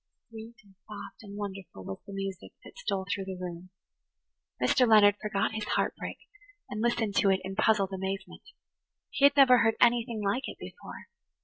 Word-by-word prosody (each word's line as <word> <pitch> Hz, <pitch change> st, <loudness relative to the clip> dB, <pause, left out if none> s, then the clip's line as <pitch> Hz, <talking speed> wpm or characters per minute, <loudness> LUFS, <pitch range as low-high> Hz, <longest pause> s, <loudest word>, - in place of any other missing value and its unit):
Sweet 225 Hz, +1 st, -10 dB
and 200 Hz, -2 st, -22 dB
soft 210 Hz, -1 st, -9 dB
and 205 Hz, -2 st, -10 dB
wonderful 195 Hz, -, -7 dB
was 95 Hz, -, -6 dB
the -, -, -8 dB
music 195 Hz, -1 st, -6 dB
that -, -, -14 dB
stole 200 Hz, -, -3 dB
through 195 Hz, 0 st, -3 dB
the 190 Hz, -1 st, -6 dB
room. 180 Hz, 0 st, -7 dB, 0.9 s
Mr. 185 Hz, -, +3 dB
Leonard 205 Hz, -2 st, +6 dB
forgot 205 Hz, -2 st, -1 dB
his 215 Hz, -1 st, -3 dB
heart -, -, 0 dB
break -, -, -6 dB, 0.5 s
and 215 Hz, -, -3 dB
listened 230 Hz, -3 st, 0 dB
to 200 Hz, -, +4 dB
it 190 Hz, -1 st, +3 dB
in 190 Hz, +1 st, -5 dB
puzzled 200 Hz, -2 st, +2 dB
amazement. 190 Hz, +1 st, -5 dB, 0.7 s
He 280 Hz, -, +3 dB
had 285 Hz, +1 st, +5 dB
never 255 Hz, -3 st, +7 dB
heard 225 Hz, -1 st, +3 dB
anything 235 Hz, -2 st, +2 dB
like 205 Hz, +7 st, 0 dB
it -, -, -8 dB
before. -, -, -10 dB
205 Hz, 180 wpm, -29 LUFS, 195-225 Hz, 0.9 s, never